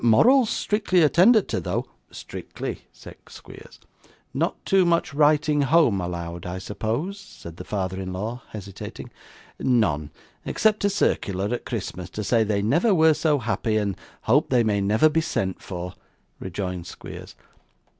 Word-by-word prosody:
'Morals 230 - +5
strictly 205 -6 +1
attended 190 +8 +5
to, - - -1
though.' - - -2 0.2
'Strictly,' - - -7
said - - -13
Squeers. - - -13 0.5
'Not - - 0
too 195 -2 +4
much 170 -4 +1
writing 150 0 +3
home 140 - +3
allowed, 85 -1 -5
I 90 +1 -4
suppose?' 115 - -3
said 85 - -12
the - - -7
father 95 -2 -3
in 95 0 -5
law, 110 +7 -4
hesitating. 100 -2 -8 0.5
'None, 90 - +1 0.3
except 215 -1 +1
a - - +4
circular 100 - 0
at 120 - -4
Christmas, 95 -6 -5
to 105 - -2
say 110 +3 +3
they 100 -2 0
never 170 - +3
were 160 -1 +5
so 150 -1 +1
happy, 115 -3 -1
and 100 -2 -1 0.3
hope 140 +7 +2
they 125 -2 +3
may 105 -2 +1
never 105 +9 +4
be 160 +1 +1
sent 95 - -2
for,' 90 -1 -6 0.5
rejoined 90 -2 -5
Squeers. - - -10
115 Hz, 150 wpm, -24 LUFS, 95-160 Hz, 0.5 s, Morals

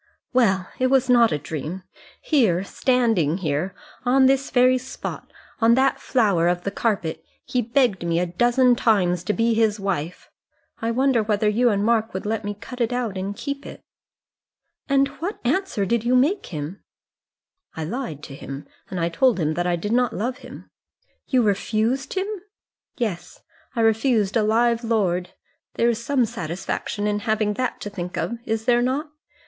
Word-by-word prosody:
"Well, 195 -7 +3
it 255 - +3
was 260 -1 +3
not 235 -2 +5
a - - +1
dream. 155 +5 -6 0.4
Here, 215 - +2
standing 225 - +1
here, 160 +1 -2 0.3
on 260 +2 +4
this 270 +1 +2
very 255 0 +4
spot 260 +1 -7 0.3
on 230 0 +5
that 270 +1 +2
flower 200 -9 +2
of 175 0 0
the 200 - -2
carpet 200 -7 -1 0.2
he 250 - 0
begged 235 -5 +1
me 170 0 +1
a 180 - +1
dozen 240 +7 +3
times 185 -8 +2
to 210 - +1
be 230 +2 +1
his 220 -1 +2
wife. 180 -4 -3 0.5
I 225 - 0
wonder 255 0 +2
whether 210 0 +1
you 235 +4 +3
and 205 -1 +1
Mark 225 -2 +1
would 190 - -4
let 220 +1 -1
me 205 0 -4
cut 250 +4 -8
it 235 0 +1
out 245 -5 -2
and 195 +2 -3
keep 280 +4 -5
it." - - -9 1.1
"And 275 0 +4
what 375 +6 -4
answer 255 - 0
did 235 +3 0
you 245 +2 +2
make 305 +11 +3
to - - -11
him?" 150 +6 -6 0.9
"I 160 - -4
lied 165 - -5
to 135 - -9
him 135 0 -8 0.2
and 170 -2 -2
told 250 +3 +3
him 155 -1 +1
that 175 +2 -1
I 175 - +2
did 205 +5 -4
not 245 -2 +2
love 250 +5 -2
him." - - -12 0.6
"You 255 -3 +3
refused 220 - 0
him?" 380 0 0 0.7
"Yes; 185 -9 -4 0.3
I 230 - +1
refused 225 -2 +2
a 225 - +4
live 230 +2 +2
lord. 185 -6 0 0.4
There 235 - +3
is 235 0 -2
some 260 -1 +2
satisfaction 205 0 -4
in 210 0 0
having 215 -1 0
that 255 +3 -2
to 205 - -4
think 180 -2 -5
of, 235 0 -2
is 225 0 -2
there 240 -1 +4
not? 275 +5 -1
225 Hz, 175 wpm, -23 LUFS, 190-250 Hz, 1.1 s, not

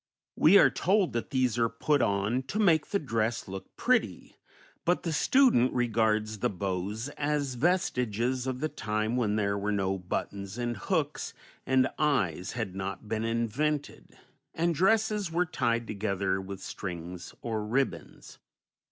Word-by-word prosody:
We 180 +6 +7
are - - +6
told 195 -1 +2
that 115 - -3
these 125 -3 +1
are 115 0 +3
put 140 +5 +1
on 105 +3 +1
"to 205 - -3
make 170 -8 +3
the 200 - 0
dress 115 - -1
look 95 0 -9
pretty," - - 0 0.5
but 175 +1 +1
the 165 - -1
student 240 - +4
regards 110 -3 +1
the - - +1
bows 100 +5 -3
as 145 -2 0
vestiges 125 - 0
of 130 0 -3
the 155 - +1
time 110 -3 -2
when 110 -4 +1
there 100 -1 0
were 105 +1 -1
no 95 -1 0
buttons 100 +3 -4
and 120 -1 -2
hooks 105 - -2 0.3
and 130 0 +4
eyes 95 - +1
had 110 -6 -3
not 95 +2 -5
been 110 +1 -2
invented, 120 +6 -2 0.4
and 170 +1 +1
dresses 210 +2 +2
were 175 +2 +2
tied 115 -7 0
together 100 -3 -1
with 95 0 -8
strings 90 -1 -6
or 110 -2 -2
ribbons. 105 - -3
115 Hz, 150 wpm, -29 LUFS, 100-145 Hz, 0.5 s, We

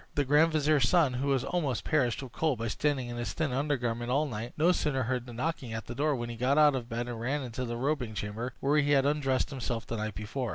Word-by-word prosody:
The 145 - +1
grand 150 +4 +4
vizier's 150 -4 +3
son, 165 -8 +4
who 130 +3 -2
was 135 -3 +2
almost 145 -10 -1
perished 135 -5 +1
with 130 - -9
cold 150 +1 0
by 115 +1 -2
standing 135 0 -1
in 120 - -5
his 120 -5 -3
thin 160 -4 -1
under 145 +3 0
garment 120 -1 -2
all 140 +4 +2
night, 120 -3 -5
no 165 +4 +4
sooner 145 -6 0
heard 125 +1 -2
the - - -8
knocking 125 -1 -3
at 110 - -4
the 120 - -6
door 145 +2 +1
than 120 - -3
he 115 - -7
got 130 +5 +2
out 150 -1 +6
of 125 -3 -4
bed 120 +1 -3
and 120 -2 -5
ran 135 +4 -1
into 125 +1 -4
the 120 0 -4
robing 130 -4 -1
chamber, 110 +6 -4
where 145 +2 +3
he 145 0 +2
had 135 -1 +4
undressed 140 -2 +1
himself 120 -4 -3
the 115 - -4
night 110 -2 -3
before. 115 +5 -4
130 Hz, 265 wpm, -30 LUFS, 120-145 Hz, -, out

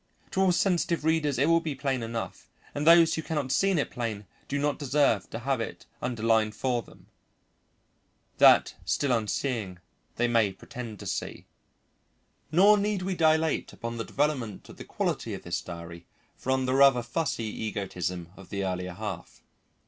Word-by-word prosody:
To 190 - 0
all 190 -1 +4
sensitive 175 -3 +1
readers 155 -4 +1
it 140 +4 +3
will 165 0 +5
be 160 -4 -4
plain 135 -2 -1
enough, 115 0 -5 0.2
and 145 +2 -2
those 165 -1 +7
who 160 - -1
cannot 150 -5 -2
see 195 +7 +3
it 170 -7 0
plain 110 -4 -4 0.2
do 145 - -2
not 145 0 0
deserve 140 - +2
to - - -5
have 130 +1 -1
it 115 - -6 0.2
underlined 110 -2 +1
for 125 -2 0
them, - - -18 1.3
that, - - +6
still 140 - 0
unseeing, 110 -3 -1 0.4
they 120 - +1
may 115 -4 +2
pretend 115 +2 -8
to - - -8
see. - - -4 1.1
Nor 200 +6 +6
need 205 -2 -1
we 190 +1 -1
dilate 160 -2 +2
upon 115 0 -5
the 115 - -2
development 135 -9 -2
of - - -12
the - - -9
quality - - -2
of - - -10
this 85 0 -3
diary 85 0 -9 0.3
from 130 0 -1
the 130 - 0
rather 135 -2 +5
fussy 130 -3 -2
egotism 95 -5 -4
of 95 -3 -14
the 100 -1 -2
earlier 90 -1 -3
half. 100 -3 -7
125 Hz, 165 wpm, -28 LUFS, 110-155 Hz, 1.3 s, those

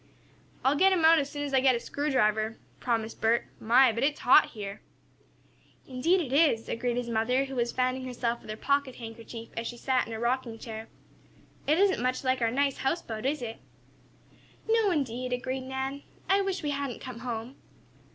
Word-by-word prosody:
"I'll 270 +2 +4
let 380 +6 +5
him 340 -4 +2
out 325 0 +7
as 280 -1 -2
soon 290 -1 -4
as 285 -1 -4
I 265 - +5
get 260 -1 +4
a - - -1
screwdriver," 225 -7 0 0.2
promised 230 -2 -2
Bert. 230 +1 +2
"My, 245 +3 +5
but 230 +2 -3
it's 290 +1 0
hot 245 - +7
here!" 200 -2 -7 1.1
"Indeed 325 +9 +2
it 270 -5 -4
is," 280 -7 +3
agreed 240 +1 -2
his 245 -1 -2
mother, 235 +4 +1
who 270 - -8
was 240 -2 0
fanning 255 +1 0
herself 240 -2 -2
with - - -14
her 215 - -4
pocket 280 +1 0
handkerchief 230 0 -9
as 230 0 -3
she 240 - -6
sat 255 +1 +1
in 230 - -6
a 220 - -4
rocking 235 -1 -1
chair. 220 -1 -7 0.8
"It 305 +2 +4
isn't 385 -6 +3
much 255 +1 -1
like 255 -1 +1
our 230 - +3
nice 275 +3 +1
houseboat, 265 -5 -2
is 290 -2 -1
it?" 225 -1 -5 1.1
"No, 445 -2 +3
indeed," 255 -6 -1
agreed 255 +1 -3
Nan. 265 +1 -3 0.3
"I 390 +1 +4
wish 390 -3 -2
we 295 - -1
hadn't 280 -4 -3
come 255 -3 -8
home." 235 +1 -5
255 Hz, 190 wpm, -28 LUFS, 230-280 Hz, 1.1 s, out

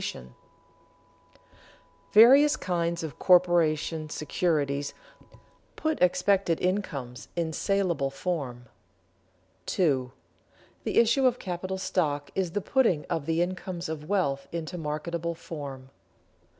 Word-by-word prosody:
[Sidenote: 60 0 -6 1.8
Various 270 +7 +7
kinds 170 -2 -1
of 150 -5 -7
corporation 165 -3 +3
securities 145 -3 -1 0.8
put 315 0 -2
expected 180 -1 +2
incomes 140 - -3
in 165 -2 -1
salable 180 -7 0
form] 135 -5 -4 1.0
2. 135 -8 +1 0.8
_The - - -1
issue 235 +4 +4
of 250 -1 +1
capital 185 -1 -4
stock 150 -6 -1
is 185 -3 -2
the 205 - -1
putting 210 - +2
of 160 -3 -2
the 165 +1 +2
incomes 185 -1 -5
of 155 -1 -6
wealth 140 -9 0
into 170 +1 -5
marketable 170 +1 -3
form. 140 -5 -8
170 Hz, 105 wpm, -27 LUFS, 145-185 Hz, 1.8 s, Various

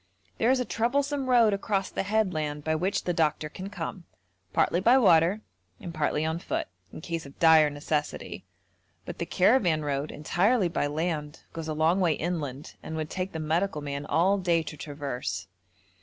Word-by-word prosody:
There 235 - +3
is 260 0 +3
a 250 - -1
troublesome 275 +4 0
road 235 -4 +5
across 195 -1 -1
the - - -2
headland 180 -8 -1
by 160 - 0
which 180 +5 -1
the 175 - -1
doctor 155 -2 0
can 185 +5 -7
come, 185 -3 -6 0.5
partly 175 - +2
by 235 +7 +5
water 185 -2 +4 0.4
and 180 -6 -7
partly 155 -1 0
on 160 +1 -1
foot, - - -3 0.2
in - - -9
case 165 -3 -4
of 140 - -15
dire 160 -3 +6
necessity, 145 +1 -3 0.6
but - - -7
the - - -3
caravan 180 -6 +3
road, 140 +1 -2
entirely 185 +6 +1
by 155 -3 0
land, 155 0 -3
goes 165 -1 -5
a 155 - -3
long 160 +4 +2
way 175 -4 +3
inland, 150 -4 -4
and 160 - -6
would 155 -1 -4
take 185 0 -3
the 160 - -5
medical 160 +1 -1
man 140 0 -4
all 190 +5 +2
day 170 -3 +1
to 155 - -7
traverse. 135 - -5
165 Hz, 180 wpm, -27 LUFS, 150-195 Hz, 0.6 s, dire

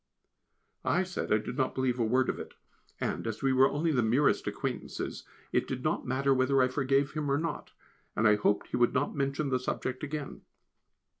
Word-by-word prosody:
I 180 - +2
said 185 -1 -4
I 105 - +6
did 110 +3 -5
not 130 - 0
believe 130 -2 0
a - - +3
word 130 +4 +2
of - - -2
it, - - -8 0.4
and, - - -2
as 115 +2 -4
we 135 -1 +3
were 130 +1 +5
only 160 +3 0
the 130 -5 +2
merest 120 +6 +2
acquaintances, - - -4 0.2
it - - +1
did - - -4
not - - -1
matter 135 +2 +2
whether 130 +1 +3
I 130 0 +4
forgave 135 +1 +1
him 150 -2 -2
or 140 - +3
not, 165 +2 -3 0.5
and 110 - +3
I 105 - +6
hoped 105 0 +1
he - - -1
would 120 +2 +3
not 140 +2 +1
mention 140 +1 -1
the 130 -1 +1
subject 130 +1 -3
again. 145 -1 -5
130 Hz, 205 wpm, -30 LUFS, 125-140 Hz, 0.5 s, I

